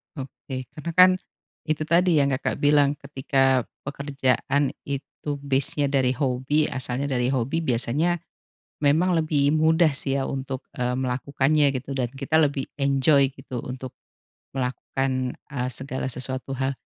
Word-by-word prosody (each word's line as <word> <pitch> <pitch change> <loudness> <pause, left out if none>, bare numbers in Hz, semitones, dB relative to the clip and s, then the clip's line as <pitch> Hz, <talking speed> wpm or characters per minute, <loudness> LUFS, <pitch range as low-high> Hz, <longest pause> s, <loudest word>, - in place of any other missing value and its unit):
Oke. 130 -2 -7
Karena 170 +2 -5
kan 185 0 +8 0.6
itu 155 0 0
tadi 170 +2 +3
yang, 140 -2 +3
Kakak 130 +2 -2
bilang 145 0 +4
ketika 135 -2 +1 0.2
pekerjaan 140 0 0 0.2
itu 140 +1 -4
base-nya 140 +1 +1
dari 130 -2 +2
hobi, 135 +3 0
asalnya 130 +1 -3
dari 125 -1 +1
hobi 135 +5 0
biasanya 145 +5 0 0.6
memang 155 +6 +3
lebih 145 -3 +2
mudah 160 +1 +4
sih 135 0 -2
ya 135 - 0
untuk, 135 -1 -4
eee, 125 0 -1
melakukannya 135 +3 +1
gitu 130 +2 -5
dan 125 -3 -1
kita 145 +4 +1
lebih 140 -3 +1
enjoy 140 0 +4
gitu 130 -2 -6
untuk 130 0 -6 0.6
melakukan, 130 0 -2 0.2
eee, 125 -3 -2
segala 130 +1 -4
sesuatu 130 +1 -3
hal. 135 +1 -1
135 Hz, 135 wpm, -25 LUFS, 130-145 Hz, 0.6 s, kan